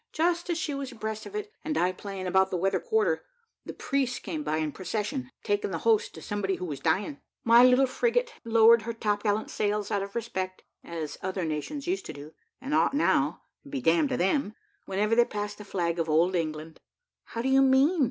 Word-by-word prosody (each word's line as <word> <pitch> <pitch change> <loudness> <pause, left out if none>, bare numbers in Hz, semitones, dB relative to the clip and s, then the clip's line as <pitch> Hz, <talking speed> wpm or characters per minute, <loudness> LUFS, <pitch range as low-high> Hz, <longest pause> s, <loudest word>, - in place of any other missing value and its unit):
Just 340 +2 0
as 340 - 0
she 315 -3 -2
was 275 -1 -4
abreast 220 -2 -5
of 420 - -10
it, 425 0 -5
and 305 0 -2
I 180 +1 +2
playing 190 0 -7
about 190 +1 +3
the 185 - -1
weather 195 +3 +1
quarter, 445 -3 +1 0.4
the - - -4
priests 265 -3 -1
came 315 - -5
by 155 - -1
in 155 -1 -1
procession, 215 - -3
taking 205 -1 0
the 170 - -2
host 225 -2 +2
to - - -10
somebody 195 -2 -1
who 180 - -5
was 150 -5 -5
dying. 205 - 0 0.2
My 235 +1 +7
little 255 +1 +6
frigate 485 - 0
lowered 230 0 +6
her 230 +1 -4
top 210 -2 -1
gallant 210 0 0
sails 210 0 -1
out 200 - +1
of 200 0 -7
respect, 190 -5 -4 0.2
as 160 -3 -6
other 185 -1 -2
nations 160 - -4
used 370 +2 -2
to - - -6
do, 145 +2 -11 0.3
and 270 +3 -4
ought 305 -2 +3
now, 300 - +2 0.2
and 280 - -15
be 280 - -2
damned 165 - +3
to - - -1
them, 210 +4 +1 0.3
whenever 205 +3 0
they 240 +1 +6
pass 205 -2 -4
the 210 - -11
flag 175 -4 -2
of 165 -1 -1
old 165 +4 +3
England 160 -2 -3 0.2
" - - -63
"How 230 - -1
do 265 - +1
you 270 0 +5
mean?" 270 +6 +4
215 Hz, 220 wpm, -28 LUFS, 185-270 Hz, 0.4 s, My